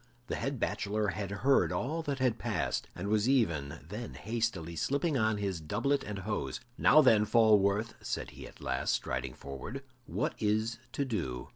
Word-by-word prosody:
The - - 0
head 135 -2 -2
bachelor 105 0 0
had 100 +2 -3
heard 125 +8 +3
all 155 +6 -1
that 145 -4 -2
had 125 -3 +1
passed, 110 -7 -1
and 90 - -4
was 105 +3 +2
even 80 - +1
then 110 +6 -6
hastily 110 -8 -2
slipping 140 - 0
on 110 -3 +2
his 95 -5 -2
doublet 120 - 0
and 105 -1 -5
hose. 105 +3 -3 0.2
"Now, 155 +5 +6
then, 110 -5 +6
Falworth," 105 -1 +4
said - - -3
he - - -9
at - - -15
last, 65 - 0
striding 65 0 -3
forward, 70 - -7 0.2
"what - - -1
is 110 +2 +1
to 140 - 0
do? 65 - -3
110 Hz, 170 wpm, -31 LUFS, 95-120 Hz, 0.2 s, Now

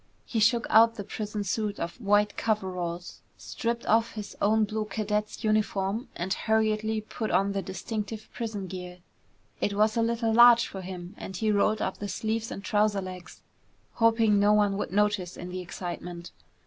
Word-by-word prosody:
He 230 - -2
shook 230 +2 +3
out 225 +1 +6
the 205 - -5
prison 210 +1 -4
suit 205 +1 -2
of 170 +8 -5
white 205 0 +3
coveralls, 180 -5 -3 0.2
stripped 235 0 -3
off 225 +1 +2
his 210 -2 -7
own 215 +2 +3
blue 215 +1 -1
cadet's 210 0 -2
uniform, 215 0 0
and 185 +2 -1
hurriedly 220 0 +1
put 215 +1 -5
on 195 +1 +2
the 200 0 -1
distinctive 215 +2 -5
prison 220 -5 -4
gear. 180 -1 -7 0.6
It 200 - -1
was 215 +1 +3
a 230 - +2
little 230 0 +1
large 235 0 +8
for 190 - -7
him 180 0 -7
and 190 - -6
he 215 +3 +1
rolled 210 +1 +2
up 190 - -2
the 205 - -4
sleeves 220 +3 -2
and 195 - -7
trouser 210 -1 +2
legs, 185 -2 -9 0.5
hoping 225 -2 +3
no 205 +1 +5
one 205 -1 +3
would - - -3
notice 205 -2 0
in 180 - -7
the 185 +1 -5
excitement. 175 0 -7
210 Hz, 175 wpm, -28 LUFS, 190-220 Hz, 0.6 s, large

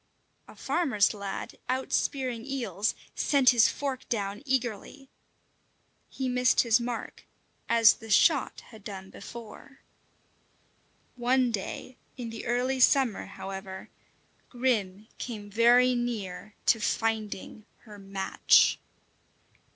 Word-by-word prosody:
A - - -14
farmer's 250 -14 +1
lad, 200 -2 -6
out 260 +1 -2
spearing 255 -4 -1
eels, 230 -7 -2 0.2
sent 275 -4 +4
his 235 -3 +5
fork 270 -2 -4
down 205 -2 -2
eagerly. 260 +1 -3 1.0
He 265 - -4
missed 250 -1 +3
his 235 -1 +3
mark 240 -1 -5 0.5
as 230 -1 +6
the 225 - -13
shot 285 +6 +3
had 220 -3 -14
done 190 -1 -8
before. 235 +5 -11 1.3
One 250 0 +2
day, 225 +4 -5 0.2
in 235 -3 -6
the 225 - -7
early 250 +2 0
summer, 255 -4 +3
however, 195 -1 -8 0.6
Grim 215 -5 -1
came 210 -4 -6
very 240 +3 +5
near 215 -5 -4
to 225 - +4
finding 220 -2 -2
her 210 -3 -13
match. 195 0 +3
230 Hz, 110 wpm, -28 LUFS, 205-255 Hz, 1.3 s, as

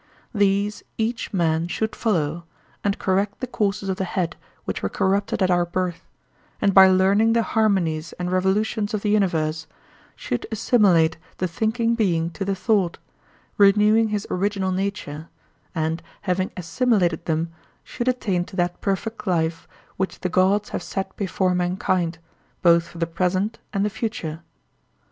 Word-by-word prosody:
These 205 0 +1 0.2
each 230 +1 -2
man 165 -3 +1
should 220 +5 -2
follow, 170 -6 -1 0.4
and 200 -1 0
correct 195 +2 0
the - - -2
courses 205 -5 -1
of 190 -1 -1
the - - -1
head 175 -2 -2 0.3
which - - -3
were 95 - -1
corrupted 195 - 0
at 185 - +2
our 175 0 +3
birth, 175 0 -3 0.5
and 200 - +2
by 190 0 +9
learning 195 +4 +4
the 230 0 +3
harmonies 180 -9 +1
and 180 0 -4
revolutions 205 +3 +1
of 205 - -4
the 210 - +1
universe, 160 -6 +1 0.5
should 120 - -3
assimilate 185 -8 +3 0.2
the 185 - 0
thinking 225 +6 0
being 170 -7 +1
to 195 - -4
the 195 0 -1
thought, 190 -3 +1 0.6
renewing 210 +2 +5
his 210 -2 -2
original 195 0 0
nature, 185 -5 -3 0.5
and 160 0 -1 0.2
having 185 -1 0
assimilated 180 0 +1
them 165 +1 -1 0.3
should 245 -1 -5
attain 200 -8 +1
to 190 - -12
that 175 -1 -1
perfect 210 +2 -3
life 165 -2 0 0.3
which 190 0 -3
the 185 - -1
gods 190 +4 +2
have - - -3
set 190 +2 -4
before 190 -1 0
mankind, 180 -1 0 0.5
both 170 -1 +5
for 170 - -13
the 165 - 0
present 185 +5 -1
and 200 0 0
the - - +1
future. 170 -8 -4
190 Hz, 155 wpm, -23 LUFS, 175-210 Hz, 0.6 s, by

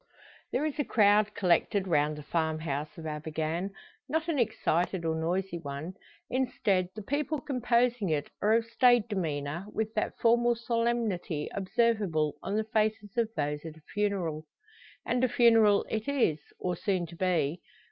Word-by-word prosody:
There 300 - 0
is 305 0 -3
a - - +3
crowd 210 -2 +3
collected 190 +2 +2
round 150 -2 +2
the 150 - -8
farmhouse 155 -2 -2
of 165 - -8
Abergann. 155 +4 -3 0.4
Not 320 +3 0
an 300 -4 0
excited, 180 -6 0
or 160 - +1
noisy 175 +2 -1
one; 145 +4 -6 0.3
instead, 205 -8 0
the 215 - -6
people 290 +5 -1
composing 245 - +1
it 150 -2 -1
are 215 +1 +3
of 230 0 +3
staid 240 -1 +4
demeanour, 165 -3 -3
with 220 0 -2
that 215 - -2
formal 240 +1 +3
solemnity 230 -9 -1
observable 195 - +1
on 200 - -3
the 220 - +1
faces 215 -2 -1
of 230 -2 +1
those 150 0 -2
at 160 -1 -8
a - - -17
funeral. 180 -7 -1 0.6
And 245 +1 0
a 255 - +4
funeral 225 -4 +5
it 220 0 -3
is, 250 - +2 0.2
or 180 -1 -2
soon 185 0 -1
to 170 +1 -11
be. 170 -3 0
200 Hz, 155 wpm, -29 LUFS, 160-230 Hz, 0.6 s, funeral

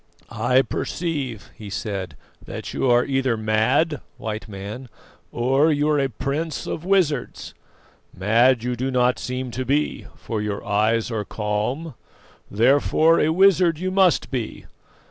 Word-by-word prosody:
"I 130 +1 +2
perceive," 140 - -4
he 105 -2 -9
said, 95 -7 -4 0.3
"that - - -7
you 130 - 0
are 120 0 +4
either 135 -4 0
mad, 115 +7 +1 0.2
White 110 +1 -5
Man, 105 +5 -8 0.4
or 135 +6 +2
you 145 0 +1
are 150 -1 +2
a 135 -1 +1
prince 140 +6 -3
of 155 - -4
wizards. 175 -8 0 0.6
Mad 115 +5 +3
you 125 0 -1
do 130 +3 -2
not 125 -1 +2
seem 125 0 -4
to 130 +3 -3
be, 145 +4 -1
for 110 -3 -4
your 105 -1 -4
eyes 110 +3 +1
are 110 -2 -2
calm, 110 +10 -3 0.6
therefore 145 +8 +3
a 155 - +2
wizard 180 -1 +4
you 185 +3 -2
must 185 -3 +3
be. 120 -5 -4
130 Hz, 145 wpm, -22 LUFS, 110-150 Hz, 0.6 s, are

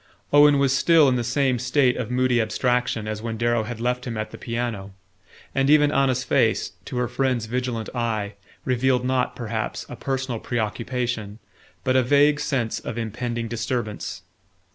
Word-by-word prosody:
Owen 145 0 +7
was 135 -1 +2
still 160 0 +5
in 130 - +3
the 120 - 0
same 130 +1 +1
state 125 +1 +2
of 120 -4 -4
moody 125 -1 +2
abstraction 120 -1 0
as 110 0 -4
when 115 0 -4
Darrow 120 -1 +1
had 120 0 -6
left 125 +1 -1
him 115 -2 -4
at 110 0 -4
the - - -9
piano; 115 -5 -4 0.6
and 135 0 +1
even 150 -1 +5
Anna's 130 -3 +2
face, - - +1
to - - -5
her 125 0 +1
friend's 125 -2 0
vigilant 120 -1 -3
eye, 110 -4 -2 0.3
revealed 125 0 +1
not, 130 -1 0
perhaps, 110 -2 -4
a 125 - -6
personal 130 -2 -3
preoccupation, 115 -1 -3 0.5
but 130 - +1
a 130 - +5
vague 145 +3 +4
sense 130 -6 -1
of 115 - -6
impending 120 +1 -3
disturbance. 115 -1 -4
125 Hz, 165 wpm, -24 LUFS, 115-130 Hz, 0.6 s, Owen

